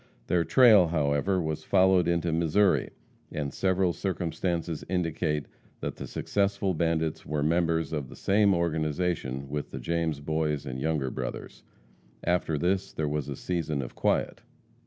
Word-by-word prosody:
Their 85 Hz, -1 st, +2 dB
trail, 110 Hz, -5 st, +6 dB
however, 75 Hz, +4 st, +1 dB
was 80 Hz, -3 st, -3 dB
followed 95 Hz, -2 st, +4 dB
into 85 Hz, -1 st, +1 dB
Missouri, 85 Hz, +5 st, +2 dB, 0.4 s
and 70 Hz, -2 st, -3 dB
several 95 Hz, -2 st, +1 dB
circumstances 85 Hz, -2 st, -2 dB
indicate 80 Hz, -4 st, -1 dB, 0.3 s
that -, -, -4 dB
the -, -, -6 dB
successful 100 Hz, -1 st, 0 dB
bandits 80 Hz, -1 st, 0 dB
were 75 Hz, -1 st, -2 dB
members 80 Hz, 0 st, +1 dB
of 70 Hz, -5 st, -3 dB
the -, -, -11 dB
same 100 Hz, -1 st, +3 dB
organization 80 Hz, -4 st, -1 dB
with 75 Hz, +1 st, -4 dB
the -, -, -7 dB
James 85 Hz, -3 st, -1 dB
Boys 75 Hz, -1 st, -1 dB
and 65 Hz, 0 st, -5 dB
Younger 75 Hz, -4 st, 0 dB
Brothers. 65 Hz, -2 st, -6 dB, 0.6 s
After 85 Hz, -3 st, +1 dB
this 95 Hz, +4 st, 0 dB
there 80 Hz, -, -2 dB
was 75 Hz, -1 st, -2 dB
a 70 Hz, -, -4 dB
season 80 Hz, -5 st, -2 dB
of -, -, -8 dB
quiet. -, -, 0 dB
80 Hz, 145 wpm, -28 LUFS, 75-90 Hz, 0.6 s, trail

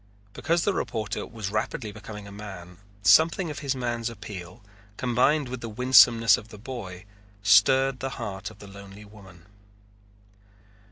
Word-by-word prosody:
Because 170 Hz, +5 st, 0 dB
the 200 Hz, -, +1 dB
reporter 110 Hz, -, -3 dB
was 110 Hz, -4 st, -6 dB
rapidly 110 Hz, +1 st, -3 dB
becoming 105 Hz, -1 st, -10 dB
a -, -, -11 dB
man 95 Hz, -4 st, -10 dB, 0.2 s
something 160 Hz, -, +4 dB
of -, -, -7 dB
his 140 Hz, -2 st, -2 dB
man's 120 Hz, -2 st, -2 dB
appeal, 100 Hz, -2 st, -10 dB, 0.3 s
combined 130 Hz, +4 st, +1 dB
with 125 Hz, -1 st, -6 dB
the 115 Hz, -, -5 dB
winsomeness 115 Hz, -2 st, +5 dB
of 105 Hz, -, -11 dB
the 110 Hz, -, -12 dB
boy, 100 Hz, -6 st, -8 dB, 0.4 s
stirred 130 Hz, +6 st, +4 dB
the 135 Hz, -, -3 dB
heart 100 Hz, -4 st, -5 dB
of 110 Hz, -, -16 dB
the 100 Hz, -, -13 dB
lonely 100 Hz, +1 st, -12 dB
woman. 95 Hz, -5 st, -16 dB
110 Hz, 150 wpm, -26 LUFS, 100-125 Hz, 0.4 s, winsomeness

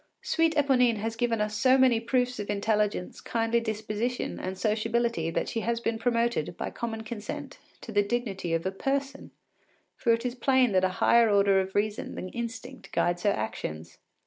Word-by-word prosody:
Sweet 325 Hz, -1 st, +2 dB
Eponine 255 Hz, -5 st, +3 dB
has 225 Hz, +2 st, -3 dB
given 230 Hz, -1 st, 0 dB
us 210 Hz, 0 st, -1 dB
so 255 Hz, +4 st, +4 dB
many 255 Hz, -3 st, +4 dB
proofs 250 Hz, +1 st, 0 dB
of 205 Hz, -, -5 dB
intelligence, 210 Hz, -2 st, -1 dB
kindly 230 Hz, 0 st, 0 dB
disposition, 220 Hz, +2 st, -3 dB
and 185 Hz, +1 st, -4 dB
sociability 220 Hz, -3 st, 0 dB
that -, -, -1 dB
she 230 Hz, -, -2 dB
has 230 Hz, +1 st, -1 dB
been 230 Hz, -1 st, -2 dB
promoted, 230 Hz, -8 st, 0 dB
by -, -, -4 dB
common 225 Hz, -1 st, -4 dB
consent, 215 Hz, -1 st, -7 dB, 0.2 s
to 230 Hz, -, -8 dB
the 205 Hz, -1 st, +3 dB
dignity 200 Hz, -6 st, -2 dB
of 165 Hz, -, -3 dB
a 190 Hz, -, 0 dB
person, 275 Hz, +7 st, -3 dB, 0.7 s
for 235 Hz, -, +1 dB
it 230 Hz, +1 st, +1 dB
is 245 Hz, -, -1 dB
plain 255 Hz, -1 st, +3 dB
that 185 Hz, -1 st, +3 dB
a 185 Hz, -, +3 dB
higher 235 Hz, -1 st, +6 dB
order 200 Hz, -1 st, +4 dB
of 190 Hz, 0 st, -6 dB
reason 210 Hz, +1 st, -1 dB
than 185 Hz, -, -5 dB
instinct 235 Hz, +3 st, -7 dB
guides 175 Hz, 0 st, +1 dB
her 205 Hz, -, +3 dB
actions. 85 Hz, -, -4 dB
225 Hz, 180 wpm, -28 LUFS, 205-240 Hz, 0.7 s, higher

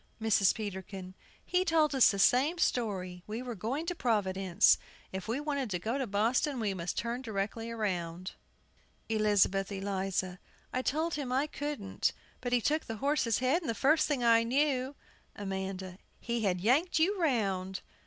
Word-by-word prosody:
MRS. 215 Hz, -4 st, +3 dB
PETERKIN. 190 Hz, -3 st, -6 dB, 0.3 s
He 365 Hz, 0 st, +2 dB
told 320 Hz, -4 st, +3 dB
us 265 Hz, -3 st, +6 dB
the 200 Hz, -, -1 dB
same 265 Hz, -, +4 dB
story, 190 Hz, -, -1 dB
we 220 Hz, +4 st, -4 dB
were 250 Hz, -1 st, -4 dB
going 235 Hz, -, -3 dB
to 355 Hz, -, -1 dB
Providence; 195 Hz, -, +2 dB, 0.3 s
if 190 Hz, +1 st, -5 dB
we 235 Hz, +5 st, -1 dB
wanted 285 Hz, -4 st, -2 dB
to 185 Hz, -, -1 dB
go 225 Hz, +9 st, -2 dB
to 265 Hz, -, -1 dB
Boston, 235 Hz, +7 st, +1 dB
we 210 Hz, -3 st, 0 dB
must 175 Hz, -1 st, -4 dB
turn 235 Hz, +2 st, -2 dB
directly 225 Hz, 0 st, -3 dB
round. 185 Hz, -5 st, -3 dB, 0.8 s
ELIZABETH 205 Hz, -3 st, +2 dB
ELIZA. 190 Hz, -2 st, -2 dB, 0.3 s
I 255 Hz, -, 0 dB
told 315 Hz, +6 st, 0 dB
him 280 Hz, -4 st, -3 dB
I 265 Hz, +3 st, +2 dB
couldn't; 290 Hz, -10 st, -2 dB, 0.3 s
but 245 Hz, -, -3 dB
he 245 Hz, -1 st, +3 dB
took 310 Hz, +6 st, +1 dB
the 225 Hz, -, -5 dB
horse's 270 Hz, -4 st, +1 dB
head, 260 Hz, +8 st, +2 dB
and 315 Hz, -, -5 dB
the 230 Hz, -, -1 dB
first 305 Hz, +6 st, +3 dB
thing 280 Hz, -5 st, 0 dB
I 230 Hz, -1 st, +6 dB
knew 265 Hz, +2 st, +1 dB, 0.4 s
AMANDA. 190 Hz, -1 st, -5 dB, 0.2 s
He 235 Hz, -1 st, -2 dB
had 180 Hz, -2 st, 0 dB
yanked 285 Hz, -, +3 dB
you 365 Hz, +4 st, +2 dB
round! 195 Hz, -, 0 dB
MRS. -, -, -35 dB
230 Hz, 170 wpm, -31 LUFS, 195-275 Hz, 0.8 s, us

